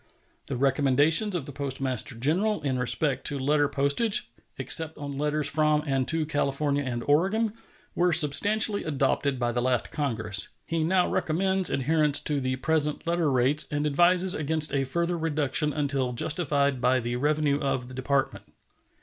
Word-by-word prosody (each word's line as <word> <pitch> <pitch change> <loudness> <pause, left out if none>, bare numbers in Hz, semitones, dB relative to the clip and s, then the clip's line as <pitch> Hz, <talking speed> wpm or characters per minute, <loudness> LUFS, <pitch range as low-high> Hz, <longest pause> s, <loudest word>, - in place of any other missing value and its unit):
The 135 - -4
recommendations 145 - +2
of 160 -6 -3
the 145 - -8
Postmaster 135 -3 -4
General 175 - -1
in 130 -3 -1
respect 130 +2 0
to 145 - +1
letter 145 +2 +1
postage, 195 +13 0 0.3
except 160 -1 +2
on 140 -1 -6
letters 150 +1 0
from 150 0 +1
and 135 -3 -1
to 160 -1 +1
California 145 -1 -1
and 120 -3 -4
Oregon, 195 +9 +1 0.4
were 175 0 +1
substantially 200 +8 +3
adopted 140 -2 -1
by 120 -1 -1
the 120 +1 -2
last 125 -1 -1
Congress. 115 -8 -2 0.2
He 165 -1 -2
now 180 +2 +2
recommends 190 +3 0
adherence 150 +1 +2
to 150 -2 0
the 130 0 -2
present 150 +2 0
letter 170 -3 0
rates 130 +4 +2
and 145 0 -2
advises 175 +5 +3
against 155 +1 0
a 135 -1 0
further 170 +5 -2
reduction 150 -1 -1
until 140 -4 -2
justified 140 -1 0
by 130 +1 +2
the 120 0 -4
revenue 145 +1 0
of 135 -3 -2
the 130 - -11
Department. 135 +1 -2
145 Hz, 160 wpm, -26 LUFS, 135-160 Hz, 0.4 s, substantially